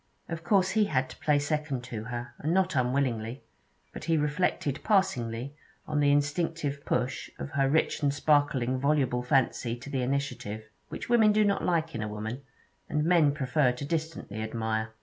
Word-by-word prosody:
Of 165 -1 -5
course 190 0 +3
he 215 -1 +3
had 130 -6 0
to - - -11
play 150 -1 +3
second 145 -3 -1
to 115 -4 -6
her, 120 0 -5
and 155 - -1
not 185 -2 +2
unwillingly; 125 -2 0 0.5
but - - -7
he 165 0 +2
reflected 150 -2 0
passingly 135 - +1 0.3
on 150 -1 -1
the 145 -1 +4
instinctive 145 0 0
push 125 +2 -1
of 140 - -6
her 135 -1 +2
rich 160 +2 +1
and 145 -1 +3
sparkling 145 -3 +2
voluble 135 -3 +1
fancy 125 -2 +1
to 125 +4 -10
the 135 -2 0
initiative, 125 -5 -2 0.3
which - - -6
women 225 -3 +5
do 215 0 +3
not 200 -1 +1
like 165 -2 0
in 115 - -3
a 110 - -2
woman, 110 +5 -5 0.5
and 150 0 0
men 165 -3 +4
prefer 140 -1 +1
to 125 +3 -6
distantly 155 -9 -3
admire. 110 0 -2
140 Hz, 175 wpm, -28 LUFS, 125-160 Hz, 0.5 s, women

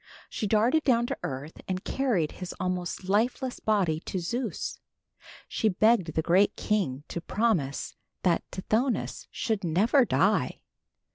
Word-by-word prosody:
She 215 - -2
darted 230 +9 +3
down 240 -4 +3
to - - -3
earth 135 +4 -6
and 185 0 -2
carried 225 - 0
his 180 -1 -7
almost 180 0 -2
lifeless 245 +5 0
body 190 -8 +1
to 185 - -5
Zeus. 235 +8 -3 0.7
She 220 - +1
begged 190 -4 +3
the 160 - +1
great 190 +5 +4
king 170 -11 -1
to 170 - -4
promise 175 -9 0 0.3
that 175 -3 +3
Tithonus 225 +6 -1
should 220 -4 -2
never 205 - +4
die. - - +1
195 Hz, 135 wpm, -28 LUFS, 170-230 Hz, 0.7 s, great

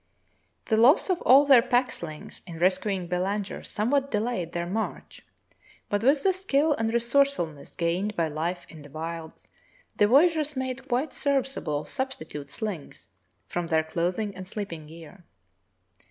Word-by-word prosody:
The 220 - +1
loss 265 - +5
of 360 - -1
all 275 +3 +7
their 270 -4 +7
pack 245 +1 +1
slings 155 -3 -8
in 170 -2 -8
rescuing 185 +2 +1
Belanger 190 +3 -2
somewhat 270 +6 0
delayed 210 -6 -1
their 170 0 -2
march, 210 +5 -4 0.7
but 205 +1 0
with 275 +3 +4
the 385 - +4
skill 315 -5 +2
and 225 -4 -1
resourcefulness 235 - 0
gained 180 +5 -1
by 165 -1 +1
life 165 +4 -3
in 160 - -12
the 145 - -13
wilds, 160 +2 -7 0.5
the 205 - +5
voya 275 +11 +6
geurs 300 -2 -2
made 260 0 -4
quite 265 +4 -1
serviceable 270 - -1
substitute 155 - -5
slings 200 -8 -6 0.4
from 175 -1 -3
their 160 -1 +2
clothing 180 +6 -2
and 185 0 -8
sleeping 185 -7 -6
gear. 165 +3 -13
205 Hz, 150 wpm, -27 LUFS, 170-265 Hz, 0.7 s, all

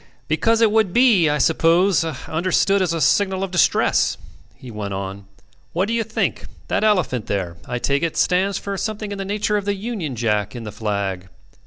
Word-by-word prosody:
"Because 230 0 +2
it 225 -2 +5
would 215 -4 +2
be, 225 -10 +5
I 150 - +1
suppose, 170 +4 +3
understood 170 +6 0
as 180 -3 +1
a 165 - -1
signal 190 +3 +2
of 195 - -4
distress," 175 -4 +2 0.4
he 125 - -11
went 100 -2 -5
on. 100 +1 -6 0.5
"What 185 +4 0
do 230 - -2
you 230 - +1
think? 220 0 -2 0.2
That - - 0
elephant 180 - +1
there, 90 -4 -3
I 125 - -2
take 140 +3 0
it, 165 -2 -2
stands 190 +2 +2
for 200 0 -4
something 215 0 -4
in 200 - -5
the 195 - -3
nature 210 +1 0
of 200 - -3
the 205 0 0
Union 195 - -4
Jack 105 -3 -1
in 120 - -6
the 105 - -6
flag. 100 -4 -3
175 Hz, 195 wpm, -21 LUFS, -, 0.5 s, it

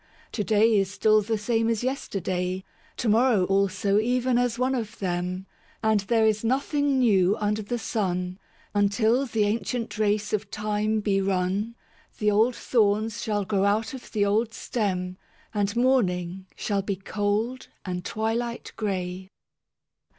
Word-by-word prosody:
To 210 - -2
day 215 +2 +4
is 195 -1 0
still 215 +1 +3
the 220 +2 -1
same 225 +2 +1
as 230 0 0
yesterday, 185 -7 -2 0.3
To 240 - -2
morrow 225 -2 +4
also 195 +1 +2
even 245 +2 +1
as 245 -1 0
one 255 +2 +1
of 230 -3 -3
them; 180 0 -2 0.4
And 220 -1 +3
there 220 +3 +2
is 215 0 +2
nothing 280 +3 +1
new 205 -6 +4
under 210 +1 0
the 230 +4 -3
sun: 185 -5 -2 0.3
Until 220 +6 +2
the 220 -3 +1
ancient 225 +2 -2
race 210 0 +1
of 210 -1 -1
Time 215 +1 -1
be 195 -2 +1
run, 195 +4 -1 0.4
The 210 -1 +2
old 225 +4 +3
thorns 215 -1 +1
shall 205 -2 -1
grow 195 0 +1
out 215 +3 +1
of 260 - -9
the 205 -2 +2
old 220 +3 +1
stem, 185 -5 -2 0.4
And 205 0 0
morning 190 -8 +1
shall 200 -2 -1
be 195 0 -2
cold 205 +6 -2 0.2
and 180 -1 -3
twilight 230 +4 -2
grey. 185 -3 -3
210 Hz, 150 wpm, -26 LUFS, 195-230 Hz, 0.4 s, day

